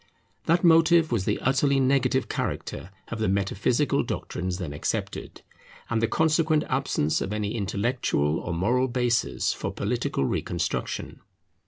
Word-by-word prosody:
That 170 +1 +3
motive 165 -1 +5
was 110 -6 0
the - - +1
utterly 135 +1 +2
negative 130 -1 +2
character 90 - -4 0.2
of 115 - -5
the 110 - +1
metaphysical 100 +8 +1
doctrines 90 0 -3
then 85 -6 -5
accepted, 75 - -4 0.5
and 115 -1 +1
the 115 - +3
consequent 155 +1 +2
absence 130 - 0
of 95 - -3
any 105 -1 -2
intellectual 100 - 0
or - - -5
moral 120 +10 +1
basis 120 -2 0
for - - -4
political 70 - -1
reconstruction. - - -3
120 Hz, 135 wpm, -26 LUFS, 100-140 Hz, 0.5 s, motive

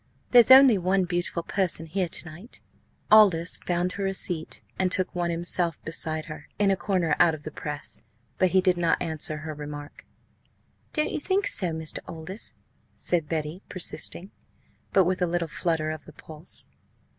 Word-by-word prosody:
There's 240 -1 +7
only 260 -5 +8
one 185 +1 +1
beautiful 175 -1 -2
person 175 -3 -1
here 180 +3 -2
to 165 - -3
night!" 170 +9 -11 0.5
Aldous 190 -6 +5
found 175 +1 -1
her 195 0 -3
a 195 - -2
seat, 165 -4 -2 0.2
and 185 -1 +1
took 185 0 -1
one 175 -1 -1
himself 170 -1 0
beside 160 -1 -2
her, 155 -2 -9
in 205 -1 +3
a - - +3
corner 185 -5 0
out 165 -2 +5
of 150 - -13
the 155 - -6
press. 150 -5 -6 0.4
But 185 - +4
he 185 +1 +3
did 185 -1 +2
not 170 -1 +1
answer 155 -2 -1
her 155 0 -6
remark. 145 0 -9 0.8
"Don't 305 0 0
you - - -2
think 385 +6 0
so, 210 - +2
Mr. 160 -1 -3
Aldous?" 165 +6 -6 0.4
said 170 -4 +1
Betty, 160 +2 -3
persisting, 180 +1 +1 0.6
but 190 -2 +4
with 185 +1 -1
a 180 - +2
little 170 0 -1
flutter 160 -1 -1
of 155 -1 -8
the - - -13
pulse. 160 +2 -7
175 Hz, 175 wpm, -26 LUFS, 160-190 Hz, 0.8 s, only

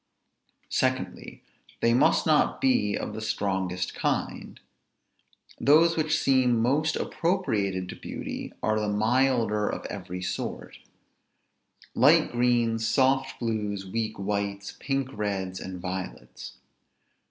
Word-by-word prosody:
Secondly, - - -2 0.4
they 115 - +3
must 125 +4 +3
not 155 -2 +3
be 250 - +2
of - - -5
the 110 - -6
strongest 95 -4 -2
kind. - - -3 1.0
Those 160 +6 +5
which 155 -1 +1
seem 130 -4 +3
most 145 +7 +1
appropriated 110 - -1
to - - -6
beauty, - - -6
are 110 0 +1
the 105 -1 -1
milder 110 -1 +2
of - - -5
every 90 -2 -6
sort; - - -5 1.1
light - - +5
greens; 120 -2 +1
soft 135 +1 +2
blues; 105 -4 -2
weak 110 +2 -3
whites; 100 0 -3
pink 135 -1 -1
reds; 95 -3 -3
and 95 -1 -7
violets. 85 -10 -7
110 Hz, 110 wpm, -27 LUFS, 100-130 Hz, 1.1 s, Those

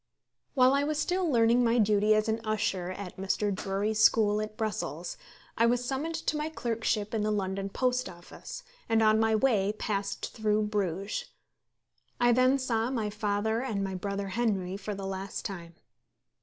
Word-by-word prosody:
While 255 0 +5
I 280 +1 +2
was 300 +1 -1
still 355 +2 0
learning 235 0 +4
my 235 0 +3
duty 210 -1 +4
as 215 +1 +1
an 220 +1 0
usher 195 -4 -1
at 185 0 -7
Mr. 195 +2 0
Drury's 205 +3 0
school 215 -2 +4
at 215 0 -6
Brussels, 180 -6 -3 0.4
I 230 - +5
was 245 +1 +1
summoned 285 +6 -2
to 310 - -1
my 300 +1 -2
clerkship 225 -6 -2
in 220 - 0
the 210 - 0
London 195 -1 -2
Post 250 +3 0
Office, 175 - -10 0.3
and 225 0 +3
on 215 0 +5
my 220 0 +3
way 210 -4 +2
passed 200 -2 -3
through 215 -1 +1
Bruges. 200 -2 -2 0.9
I 240 0 +5
then 255 +3 +4
saw 235 -3 0
my 225 -5 -2
father 210 +1 0
and 215 -7 -2
my 195 -1 -3
brother 200 +1 -3
Henry 195 -4 -1
for 200 +1 -5
the 195 0 -6
last 195 0 -5
time. 170 -4 -6
215 Hz, 170 wpm, -29 LUFS, 200-235 Hz, 0.9 s, While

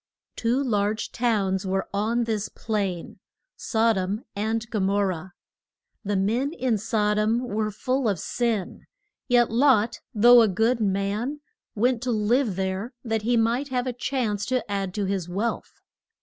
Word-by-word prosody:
Two 240 +4 +1
large 210 -3 -1
towns 200 -6 0
were 190 +1 -1
on 225 +4 +1
this 220 -3 -2
plain, 200 -6 -3 0.4
Sod 225 -2 +1
om 195 +5 -3
and 220 +3 -1
Go 220 - -1
mor 200 +1 +2
rah. 180 0 -5 0.7
The 205 -1 -1
men 230 +10 0
in 250 -9 0
Sod 210 -1 +1
om 220 +2 +2
were 215 -1 -1
full 255 +3 -1
of 195 -5 -1
sin, 230 -3 -2 0.4
yet 245 -3 +3
Lot, 235 -2 +3
though 240 +3 +7
a 225 - +5
good 225 +5 +1
man, 210 +7 -1 0.3
went 240 +2 +1
to 250 -1 -1
live 220 0 +1
there 190 +6 -3
that 225 -3 -1
he 235 +2 +1
might 235 +5 +1
have 250 -2 -1
a 255 - -2
chance 240 -4 -2
to 255 -5 -1
add 195 -2 -2
to 205 -2 -1
his 190 -3 -2
wealth. 210 +6 -2
220 Hz, 160 wpm, -25 LUFS, 200-240 Hz, 0.7 s, though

